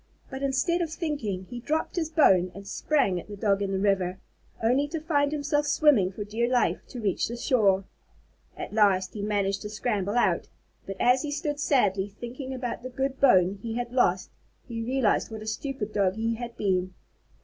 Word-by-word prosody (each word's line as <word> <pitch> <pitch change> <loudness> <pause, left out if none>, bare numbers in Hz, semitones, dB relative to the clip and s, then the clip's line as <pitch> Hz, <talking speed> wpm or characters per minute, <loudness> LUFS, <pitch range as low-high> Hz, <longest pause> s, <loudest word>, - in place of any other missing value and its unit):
But 265 0 -6
instead 275 +6 +1
of 335 - -1
thinking, 285 - -3
he 245 +5 -7
dropped 310 +6 -2
his 325 -3 -1
bone 190 - +4
and 200 0 -10
sprang 200 -8 +1
at - - -11
the 205 -1 -8
Dog 200 -1 +1
in 195 -1 -1
the 195 - 0
river, 190 -2 +1 0.5
only 260 +6 +3
to 325 +2 -4
find 290 -3 +1
himself 295 0 0
swimming 285 - +4
for 205 +2 -5
dear 225 +4 -1
life 250 -1 +2
to 250 - -8
reach 205 -5 0
the 235 - -5
shore. 210 -7 +3 0.7
At - - -6
last 190 -4 +3
he 210 - -5
managed 200 -1 0
to 210 - -6
scramble 210 -2 -2
out, 240 - +2 0.4
and 195 -1 -6
as 250 +1 +4
he 300 - -4
stood 290 0 -3
sadly 205 -9 +2
thinking 255 +3 -6
about 250 -3 -4
the 255 - -6
good 265 +1 -2
bone 195 -7 +4
he 225 0 -4
had 245 0 -3
lost, 185 -8 +2 0.4
he 230 -2 -4
realized 250 -1 +1
what 220 -1 -7
a - - -9
stupid 220 -1 -4
Dog 195 -2 +2
he 225 +1 0
had 235 0 -7
been. 185 -2 0
230 Hz, 195 wpm, -27 LUFS, 200-270 Hz, 0.7 s, bone